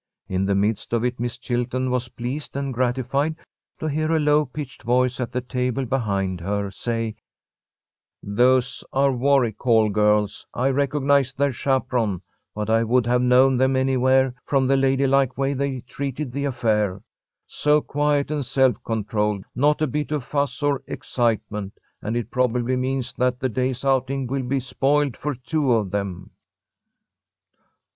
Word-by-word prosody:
In 95 +1 -1
the 100 - +2
midst 105 +3 -1
of 115 0 +1
it, 125 0 -2
Miss 120 0 -3
Chilton 125 +1 -2
was 125 -1 -1
pleased 125 +6 -5
and 140 -1 -2
gratified 130 +5 0 0.4
to - - -4
hear 155 +1 0
a - - +3
low 150 0 +3
pitched 135 0 -7
voice 125 +2 +1
at 120 -3 -3
the 125 - -2
table 125 +1 -2
behind 100 -8 -1
her 100 +2 -2
say: 115 +1 -3 1.1
"Those 125 +5 +2
are 135 +1 +3
Warwick 130 -3 +2
Hall 110 -3 +4
girls. 105 0 +2
I 130 +2 +1
recognize 140 -1 +1
their 140 +1 +1
chaperon, 125 -6 0 0.3
but 105 -1 -3
I 115 +1 +3
would 120 +1 +2
have 125 +1 +2
known 125 +1 +5
them 130 +1 +2
anywhere 130 0 +3
from 135 -2 +1
the 135 +1 +3
ladylike 135 -1 +2
way 135 +1 0
they 135 -2 -2
treated 135 +2 -5
the 140 +3 -2
affair. 105 -7 0 0.4
So 150 0 +2
quiet 145 0 0
and 150 -2 -1
self 130 0 +1
controlled, 105 -2 -1
not 150 +4 +2
a - - +4
bit 150 +2 -3
of 150 -4 -1
fuss 140 0 -2
or 145 -2 +1
excitement, 110 -4 -2 0.2
and 110 +3 -2
it 120 -1 -4
probably 125 0 +1
means 130 0 -2
that 125 0 +1
the 130 - 0
day's 130 +2 -2
outing 135 0 +1
will 135 +2 -2
be 130 +1 -1
spoiled 140 +1 +1
for 150 -1 -3
two 140 +2 -1
of 105 -5 0
them." 100 -3 -4
130 Hz, 160 wpm, -23 LUFS, 115-135 Hz, 1.1 s, known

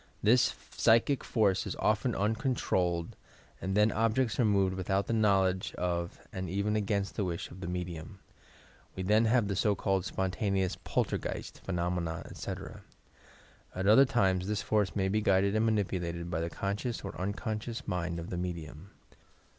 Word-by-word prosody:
This 120 +4 +4 0.2
psychic 115 +4 +3
force 100 -5 +1
is - - -3
often 110 +3 +1
un 105 +3 +1
controlled 90 - 0 0.5
and 95 +2 -1
then 105 +1 +5
objects 115 +3 +1
are 120 - +4
moved 100 -3 +3
without 95 +1 0
the - - -2
knowl 100 -4 +4
edge 95 0 -2
of 85 -1 -2
and 95 -2 -4
even 100 +3 0
against 100 -1 0
the 105 - 0
wish 85 -3 -4
of 90 - -10
the 90 - -5
medium. 90 +1 -5 0.8
We 95 - -3
then 105 +4 +4
have 115 -2 +3
the 100 - -1
so 105 +1 +2
called 95 -2 0
spontaneous 95 0 -1
"Poltergeist" - - -3
Phe 95 - -4
nomena, 85 -1 -2
etc. - - -7 0.9
At 95 +1 -2
other 110 +7 +7
times 95 -8 +1
this 105 -1 -1
force 105 -3 +1
may 95 -2 +1
be 105 +3 +1
guided 100 0 +3
and 110 +1 +3
manipulated 90 -5 -1
by 80 - -1
the 85 - -2
conscious 100 +7 -3
or 100 - -6
unconscious 110 +5 -3
mind 90 -1 -2
of 85 0 -6
the 90 - -2
medium. 85 -1 -5
100 Hz, 170 wpm, -31 LUFS, 90-110 Hz, 0.9 s, other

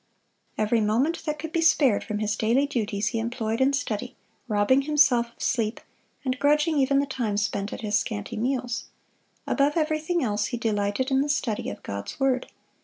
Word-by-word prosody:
Every 215 +2 +2
moment 240 +10 +1
that 300 -1 -2
could 320 +1 -6
be 335 - 0
spared 280 -9 +4
from 210 - -3
his 210 -1 -1
daily 235 +7 +2
duties 215 -6 -1
he 225 - -2
employed 225 0 -2
in 265 +1 +4
study, 250 -3 -3 0.3
robbing 215 +5 +3
himself 275 -5 +3
of - - -31
sleep, 225 -3 0 0.5
and 255 -1 -1
grudging 300 +2 +3
even 275 +1 +3
the 280 - +3
time 235 -7 -2
spent 205 0 -1
at - - -6
his 210 -1 +1
scanty 215 +1 -4
meals. 245 +1 -2 0.6
Above 285 +3 +1
everything 310 +2 0
else 210 -3 0
he 240 - -3
delighted 215 +3 -1
in 265 0 +3
the 290 - -1
study 235 -6 -1
of 100 - -8
God's 100 - -6
word. 265 -2 +1
245 Hz, 180 wpm, -26 LUFS, 215-280 Hz, 0.6 s, spared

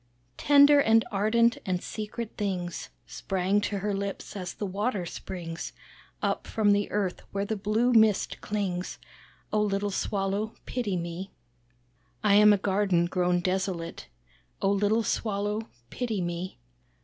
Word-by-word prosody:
Tender, 285 0 +7
and 225 -2 +4
ardent, 225 +3 +3
and 180 -1 -2
secret 220 +1 -5
things, 185 -4 -3 0.2
Sprang 195 +1 0
to 205 0 -2
her 205 +1 -1
lips, 200 +1 -4
as 180 -3 -5
the 210 - -3
water 200 0 -1
springs 170 -1 -6 0.5
Up - - -1
from 210 -2 +2
the 205 0 +2
earth 200 -3 -1
where 200 0 -1
the 220 - -2
blue 215 +5 +1
mist 220 -3 +3
clings. 190 -4 -3 0.6
Oh 215 - +3
little 205 0 0
Swallow 200 +2 -1
pity 215 -7 -2
me. 170 +3 -5 0.9
"I 210 -2 +4
am 210 +1 +8
a 205 - +5
garden 190 -3 +2
grown 180 0 +1
desolate, 185 - -2 0.5
Oh 195 - +2
little 205 +3 +2
Swallow 210 0 -1 0.2
pity 230 -5 -2
me. 175 +1 -4
200 Hz, 135 wpm, -28 LUFS, 185-215 Hz, 0.9 s, am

